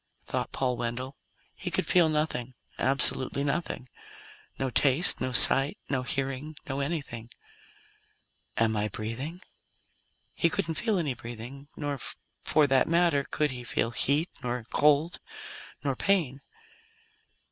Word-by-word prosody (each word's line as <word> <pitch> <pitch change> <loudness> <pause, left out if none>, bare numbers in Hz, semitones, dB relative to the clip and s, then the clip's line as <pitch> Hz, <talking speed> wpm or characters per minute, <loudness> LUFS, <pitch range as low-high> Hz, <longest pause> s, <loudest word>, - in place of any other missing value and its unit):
thought - - -3
Paul 125 -2 -1
Wendell. 120 +3 -4 0.4
He - - -4
could - - +1
feel 175 -3 +4
nothing. 150 -5 -2 0.2
Absolutely 135 +1 +3
nothing: 145 -3 -2 0.7
No 130 -1 -2
taste, 145 +7 +3
no 130 0 -1
sight, 135 +3 +6
no 135 -2 +1
hearing, 135 +4 -2
no 135 0 -3
anything. 140 -6 -4 1.3
"Am 110 -1 +2
I 105 0 0
breathing?" 120 - -5 0.9
He 170 - +2
couldn't 165 0 -1
feel 215 +4 0
any 150 -7 0
breathing. 120 +3 -9
Nor, 145 -2 -3 0.4
for 155 - +4
that 135 -2 +3
matter, 170 -4 +3
could 150 +1 -1
he 125 -1 -6
feel 115 -1 -1
heat, 145 +7 +2
nor 125 -1 -3
cold, 150 +3 +3 0.6
nor 140 -2 0
pain. 155 -7 +1
135 Hz, 125 wpm, -28 LUFS, 125-155 Hz, 1.3 s, sight